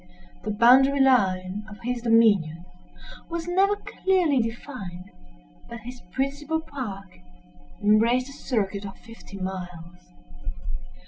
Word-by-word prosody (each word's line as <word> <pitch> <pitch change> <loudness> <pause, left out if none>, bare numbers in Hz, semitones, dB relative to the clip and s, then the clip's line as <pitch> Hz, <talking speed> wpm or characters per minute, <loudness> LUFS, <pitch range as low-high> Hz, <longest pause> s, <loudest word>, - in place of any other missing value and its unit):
The - - -4
boundary 255 +6 +5
line 195 -7 +2
of 205 - -10
his 245 0 -2
dominions 205 -8 +3 0.6
was 340 0 -4
never 385 +3 +3
clearly 365 -8 +1
defined; 225 -6 -5 0.6
but 235 -1 -8
his 245 +2 -9
principal 285 - -1
park 210 - -7 0.6
embraced 230 +5 +3
a - - -10
circuit 205 -7 -2
of 195 -1 -8
fifty 230 -4 -12
miles. 180 -2 -7
230 Hz, 110 wpm, -25 LUFS, 195-270 Hz, 0.6 s, boundary